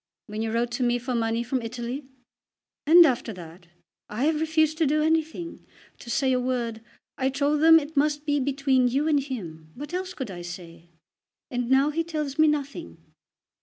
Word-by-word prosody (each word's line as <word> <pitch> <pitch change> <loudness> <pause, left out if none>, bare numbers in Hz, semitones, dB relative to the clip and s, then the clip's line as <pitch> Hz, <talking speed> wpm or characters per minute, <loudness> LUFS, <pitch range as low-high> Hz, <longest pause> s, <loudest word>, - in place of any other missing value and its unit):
"When 210 0 -5
you 225 0 -2
wrote 235 +1 0
to 250 +2 -3
me 240 0 +2
for 250 +1 -4
money 230 0 0
from 250 +1 -2
Italy?" 240 +4 -5 0.8
"And 340 +2 +9
after 245 -5 0
that. 175 -1 -12 0.4
I 215 +5 -3
have 305 +1 +1
refused 315 0 +1
to 320 - +3
do 305 +2 +2
anything; 320 +1 -1 0.4
to 235 - -11
say 260 +2 +1
a 250 - +2
word. 240 -3 -2 0.4
I 265 0 +1
told 285 +2 0
him 325 0 +8
that 295 -2 -1
it 315 - -17
must 295 +1 +1
be 290 -1 +1
between 270 -1 +2
you 275 +5 0
and 300 -2 +3
him. 175 - -7
What 295 +6 -8
else 370 0 -4
could 255 -7 -5
I 175 -1 -7
say? 170 -1 -10 0.6
And 245 -1 -2
now 270 +3 +4
he 330 +2 -1
tells 305 -4 -4
me 315 - +6
nothing." 300 +2 -3
270 Hz, 195 wpm, -25 LUFS, 235-305 Hz, 0.8 s, And